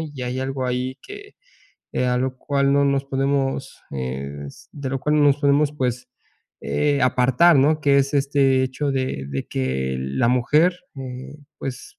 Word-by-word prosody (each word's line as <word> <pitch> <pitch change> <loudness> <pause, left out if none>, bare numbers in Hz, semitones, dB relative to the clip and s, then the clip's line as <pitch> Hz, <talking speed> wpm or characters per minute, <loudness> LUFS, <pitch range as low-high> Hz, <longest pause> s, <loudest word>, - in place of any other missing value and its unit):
y 145 -5 -6
hay 125 +1 -3
algo 135 0 -3
ahí 125 +1 -2
que, 410 +1 -11 0.6
eh, 125 - 0
a 125 0 +1
lo 130 0 -2
cual 140 0 +1
no 140 0 +3
nos 140 0 +1
podemos 135 0 -1
es 70 +2 -6
de 140 -3 -5
lo 135 - -2
cual 150 +2 +1
no 150 - +4
nos 140 0 +4
podemos, 145 +1 +3
pues, 125 -3 -2 0.5
eh, 145 -1 0
apartar, 130 +6 +4
¿no?, 150 +3 +3
que 140 -1 +4
es 140 +1 +1
este 135 -2 +3
hecho 135 +2 -2
de 130 - -2
de 70 -1 -4
que 65 0 -2
la 65 - 0
mujer, 150 +8 +3 0.2
eh, 135 +2 -8 0.2
pues, 130 -1 -7
135 Hz, 170 wpm, -22 LUFS, 125-140 Hz, 0.6 s, no